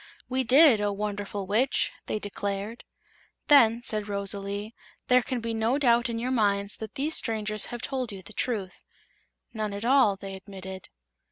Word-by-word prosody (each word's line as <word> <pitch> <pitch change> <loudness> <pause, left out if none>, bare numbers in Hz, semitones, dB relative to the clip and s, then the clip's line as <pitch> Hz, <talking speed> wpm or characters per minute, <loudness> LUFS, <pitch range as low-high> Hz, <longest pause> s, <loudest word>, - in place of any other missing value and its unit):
"We 260 +1 0
did, 255 -2 +6
O 205 0 +1
Wonderful 205 -1 -4
Witch!" 225 +8 +1 0.2
they - - -1
declared. 205 +2 -5 0.6
"Then," 235 -5 +6
said 215 -3 0
Rosalie, 200 +1 -2 0.4
"there 250 0 +6
can 245 0 -3
be 230 0 -3
no 225 +4 +1
doubt 240 -3 +3
in 230 - -3
your 245 +3 -2
minds 200 -4 +1
that 220 -2 -8
these 295 +4 0
strangers 215 -2 0
have 240 -1 -7
told 260 -4 -2
you 195 -2 -9
the 215 - -12
truth." 205 -5 -3 0.7
"None 215 -2 -3
at 205 +3 -5
all," 255 -6 +4
they 195 0 -8
admitted. 190 -1 -9
215 Hz, 165 wpm, -27 LUFS, 200-240 Hz, 0.7 s, did